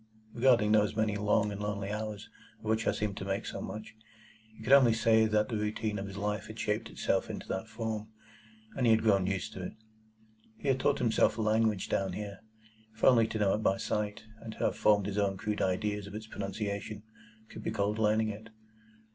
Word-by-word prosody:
Regarding 120 -4 +4
those 105 -1 +3
many 110 -1 +1
long 105 0 +2
and 100 0 -5
lonely 100 -1 -3
hours 105 -1 -4 0.3
of - - -16
which 110 +1 0
I - - +5
seemed 105 -2 -3
to - - -4
make 100 +3 -2
so - - -5
much, 110 0 -7 0.6
he 110 - -11
could 135 - +3
only 130 -5 +7
say 110 -1 +4
that 105 0 +2
the 115 - -3
routine 105 0 -2
of 100 - -5
his 100 0 -8
life 105 +1 -2
had 110 +1 -9
shaped 105 -1 -1
itself - - -1
into - - -6
that 95 +3 -3
form, 110 -1 -4 0.7
and 125 -3 +1
he 115 - +7
had 110 - +2
grown 100 -4 +3
used 100 +3 -2
to 95 - -7
it. 90 - -5 0.8
He 140 - -2
had 130 -1 +2
taught 140 +1 +2
himself 115 -2 +2
a 110 - 0
language 110 -2 +2
down 95 -2 -1
here,—if 110 +2 -11
only 115 -4 +6
to 115 0 -4
know 100 -2 +2
it - - +1
by 95 -2 +2
sight, 105 +2 -2 0.2
and 115 -1 -8
to - - -15
have - - +1
formed 105 -2 +3
his 105 0 -2
own 100 -1 +1
crude 105 +2 -2
ideas 100 +2 -1
of 100 - -9
its 110 0 -6
pronunciation, 100 0 -4 0.5
could - - -8
be - - -3
called 105 0 -1
learning 110 0 +2
it. 110 +2 -8
105 Hz, 215 wpm, -31 LUFS, 100-110 Hz, 0.8 s, only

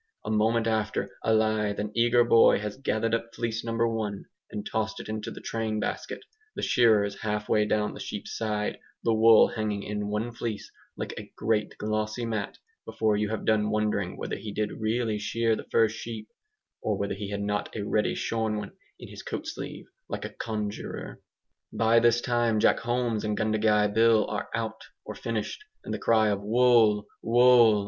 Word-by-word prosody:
A 110 - -2
moment 110 +1 +2
after 110 -1 -1
a 115 - +2
lithe 110 -2 +1
and 105 0 -3
eager 120 +1 +4
boy 115 -1 +6
has 105 0 -4
gathered 115 -4 -1
up 115 0 -2
fleece 115 -1 -2
number 115 0 0
one, 110 -3 -3 0.2
and 105 - -6
tossed 110 0 -2
it - - -8
into 110 0 -4
the - - -9
train 110 -1 -2
basket, - - -4 0.3
the - - -4
shearer 110 -4 +4
is 100 - -5
halfway 105 0 0
down 105 0 0
the - - -10
sheep's - - -6
side, 105 -2 -2 0.2
the 115 - +2
wool 110 0 +7
hanging 105 -2 -2
in 105 0 -3
one 105 +3 -2
fleece 115 -2 -5 0.3
like - - -4
a - - -11
great 110 -1 0
glossy 110 +2 -2
mat, 110 -3 -3 0.3
before 110 -1 0
you 105 0 0
have 110 - -3
done 105 -1 +2
wondering 105 -3 -1
whether - - -4
he 105 - -7
did 105 0 -2
really 110 -1 0
shear 115 +2 +1
the - - -7
first 110 -1 +3
sheep, 110 -2 -7 0.5
or 105 -2 -1
whether 100 0 -2
he 100 0 -5
had 100 0 -3
not 105 0 -1
a 105 - -3
ready 105 +1 0
shorn 110 -2 -1
one 105 - -5 0.3
in - - -9
his - - -10
coat - - -5
sleeve - - -6 0.2
like - - -4
a - - -4
conjuror. 105 -2 -5 0.5
By 115 +1 +4
this 120 0 +3
time 120 -3 +1
Jack - - +4
Holmes 120 -2 -1
and 105 -1 -1
Gundagai 105 -1 +2
Bill 110 -1 +5
are - - -4
'out,' 110 -1 -4 0.2
or - - -6
finished; 115 - -4 0.2
and - - -5
the - - -3
cry 110 -2 +3
of 100 -1 -1
"Wool!' 110 -1 +4 0.2
Wool!" 120 -2 +6
110 Hz, 185 wpm, -27 LUFS, 105-115 Hz, 0.5 s, wool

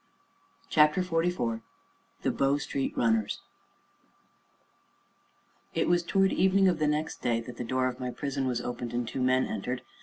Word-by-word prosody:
CHAPTER 150 +4 +4
XLIV 165 -10 0 0.6
THE - - +2
BOW 140 +1 +2
STREET 140 -2 -3
RUNNERS 110 -3 +1 2.3
It - - +1
was 175 0 +3
toward 195 +2 +2
evening 190 +1 +4
of 175 -3 +2
the 155 - +2
next 150 +2 -1
day 115 -1 +1
that 120 0 -9
the - - -3
door 130 +2 0
of 125 0 -4
my 125 -1 -3
prison 135 +1 -2
was 120 -1 -1
opened, 120 -1 -4
and 120 -1 -1
two 130 - -3
men 130 0 +3
entered. 125 0 -4
130 Hz, 155 wpm, -29 LUFS, 120-165 Hz, 2.3 s, CHAPTER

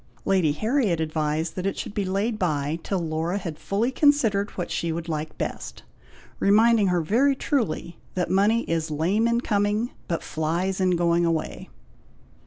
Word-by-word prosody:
Lady 185 -6 +3
Harriet 215 - +1
advised 155 0 -1
that 185 +1 -2
it 195 - -2
should - - -5
be 205 -2 -1
laid 205 +4 -1
bye 155 -2 -1
till 195 - -2
Laura 165 +2 -2
had 170 -6 -6
fully 220 +6 0
considered 240 -9 +3
what 175 - -3
she 170 - -1
would 165 +1 -4
like 155 -1 -4
best; - - -5 0.6
reminding 215 +1 +4
her 180 -2 +2
very 250 - +2
truly, 230 - -2 0.2
that 180 -1 0
money 210 +5 +3
is 165 -1 -2
lame 180 +9 +1
in 235 0 +1
coming, 210 +2 0 0.2
but 170 - -2
flies 175 +5 -1
in 185 -1 +3
going 170 0 +2
away. 165 -2 -2
185 Hz, 165 wpm, -25 LUFS, 165-215 Hz, 0.6 s, reminding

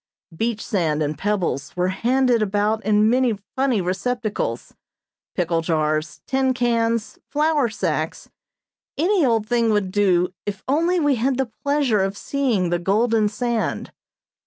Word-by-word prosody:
Beach 225 +3 -2
sand 155 -6 0
and 150 +1 -2
pebbles, 175 -7 -2
were 180 +1 +1
handed 245 +4 +2
about 210 +1 0
in 210 +1 +3
many 245 -2 +2 0.2
funny 260 -6 +1
receptacles, 195 - -2 0.6
pickle 170 -1 0
jars, 155 -1 -1
tin 265 -1 +1
cans, 230 -2 0
flour 295 -3 +2
sacks, 215 - -3 0.7
any 360 +4 +2
old 225 -5 +2
thing 235 -1 +2
would 205 -3 +1
do 180 -3 +2
if 200 -2 -5
only 335 +6 +2
we 290 -4 +2
had 255 +3 0
the 265 -4 -1
pleasure 280 -7 +2
of 195 +1 -2
seeing 235 -12 0
the 175 - +1
golden 215 +4 +2
sand. 235 +1 -2
220 Hz, 135 wpm, -22 LUFS, 190-255 Hz, 0.7 s, in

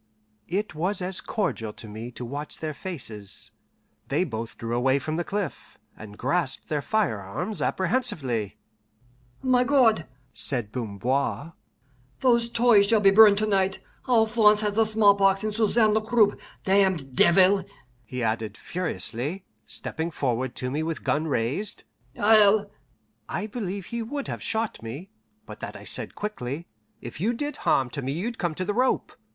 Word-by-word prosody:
It 200 +2 -2
was 180 +6 0
as 185 0 -2
cordial 115 - -2
to 110 - -9
me 110 +3 -7
to 125 - -6
watch 145 +5 -5
their 155 -1 -4
faces. 120 - -6 0.6
They 145 +6 +1
both 115 -8 -5
drew 115 +1 -3
away 130 +2 +3
from 155 +3 -3
the 175 - 0
cliff, 200 -3 -5 0.2
and 105 -1 -11
grasped 145 +2 -1
their 150 -2 0
firearms 160 - -2
apprehensively. 160 - -1 0.9
"My 255 -1 +4
God," 245 - +3 0.3
said 120 -6 +2
Bamboir, 130 - -2 0.7
"those 235 -2 +3
toys 230 -4 +5
shall 225 +1 +4
be 195 -1 +5
burned 205 0 +8
to 215 - +1
night. 195 -2 +1 0.3
Alphonse 220 -2 +4
has 210 -1 0
the 225 +1 +3
smallpox 200 -2 +4
and 215 -1 -1
Susanne 220 0 +3
the 220 - +2
croup 215 -1 +3 0.2
damned 190 -9 +2
devil!" 190 +5 +5 0.4
he 125 +2 -5
added 110 -1 -2
furiously, 170 -1 -3 0.2
stepping 160 +1 -3
forward 130 -5 -2
to 125 0 -2
me 150 +3 -1
with 160 -1 -3
gun 155 +2 0
raised, 140 - -2 0.4
"I'll 205 -1 +5 0.3
" - - -43
I 210 - -3
believe 200 -4 -4
he 235 +3 -4
would 280 +5 -4
have - - -5
shot 225 0 -2
me, 135 +12 -8 0.3
but - - -10
that - - -6
I - - -10
said - - -3
quickly, 165 -7 -4 0.4
"If 120 +6 -8
you 225 +5 +2
did 290 +5 -3
harm 130 -2 +1
to 140 - -4
me 135 +1 -2
you'd 225 +9 -4
come 170 -4 -1
to 185 - -3
the 205 - -1
rope. 255 +4 0
185 Hz, 160 wpm, -26 LUFS, 130-215 Hz, 0.9 s, burned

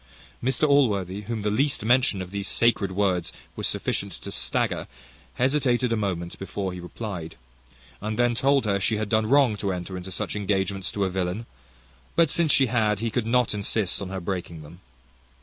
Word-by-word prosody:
Mr 130 +4 +2
Allworthy, 105 -9 +2
whom 115 -3 -3
the 105 - +1
least 135 0 +1
mention 120 -5 +3
of 90 - -11
those 100 0 -3
sacred 115 -5 +2
words 95 -3 0 0.2
was - - 0
sufficient - - -2
to - - -8
stagger, - - 0 0.5
hesitated 125 -2 +2
a - - +3
moment 90 -5 -3
before 95 -1 -4
he 90 - -7
replied, 90 -2 -6 0.7
and 110 +1 -3
then 120 0 +3
told 135 +2 +2
her, 100 -2 +1
she 105 +3 +1
had 105 -1 -2
done 110 -1 +2
wrong 135 -5 +5
to 100 -1 -2
enter 90 +1 -5
into 90 +1 -6
such - - -3
engagements 95 -2 -1
to 100 - -1
a 95 - +1
villain; 95 +4 -2 0.7
but 165 -3 +4
since 165 -3 +3
she 135 - +5
had, 110 -4 +1
he 115 0 -2
could 115 -1 -1
not 125 0 +2
insist 100 -1 0
on 95 - -4
her 95 0 -4
breaking 85 -3 -4
them. 80 +4 -13
105 Hz, 185 wpm, -25 LUFS, 95-120 Hz, 0.7 s, wrong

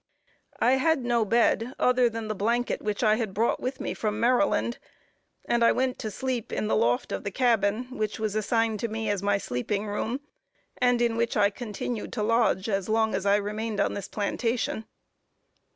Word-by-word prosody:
I 255 +2 +4
had 310 -2 +1
no 240 -1 +2
other 215 - 0
bed 235 +1 +2
than 240 -3 +2
the 215 - -1
blanket 235 +4 0
which 210 +2 -2
I 215 -1 +4
had 220 -5 -3
brought 225 +3 +1
with 260 +2 -4
me 275 - -3
from 210 -1 -2
Maryland; 245 0 +2 0.7
and 235 0 +2
I 230 - +6
went 255 0 0
to 220 - -3
sleep 250 +1 -3
in - - -1
the 210 - +1
loft 120 +1 +1
of - - -3
the - - -2
cabin 225 -1 +2
which 215 -3 -2
was 215 -2 -2
assigned 220 0 0
to 235 - -1
me 220 -1 -2
as 200 -2 -1
my 200 0 +2
sleeping 200 +7 -2
room; 220 +5 -3 0.6
and 245 -1 +3
in 230 -1 +1
which 235 0 0
I 200 -1 +4
continued 215 +1 -5
to 215 - -1
lodge 225 -3 +2
as 195 -2 -1
long 220 0 +2
as 195 +1 -1
I 200 - +5
remained 210 +1 -2
on - - +1
this 200 -2 -5
plantation. 225 +2 -2
225 Hz, 195 wpm, -27 LUFS, 210-240 Hz, 0.7 s, I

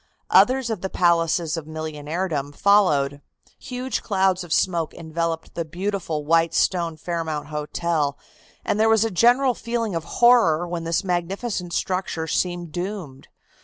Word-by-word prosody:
Others 255 -2 +4
of 210 -5 -3
the 190 - -3
palaces 170 -2 +2
of 155 -2 -6
millionairedom 155 -1 -4
followed. 145 -9 +3 0.4
Huge 255 +1 -4
clouds 190 -3 +1
of 175 - -12
smoke 170 -3 +1
enveloped 165 0 -3
the 170 - -2
beautiful 170 -2 -3
white 165 +1 +2
stone 170 -3 +1
Fairmount 160 -3 -4
Hotel, 150 -1 -1 0.5
and 210 - 0
there 220 +1 +4
was 225 0 +4
a 225 - -2
general 245 +7 +4
feeling 230 -3 -3
of 165 -1 -2
horror 225 -9 +5
when 170 -1 -4
this 165 +4 0
magnificent 180 +1 -2
structure 185 -3 -2
seemed 175 0 -2
doomed. 175 -6 -6
175 Hz, 140 wpm, -23 LUFS, 160-200 Hz, 0.5 s, horror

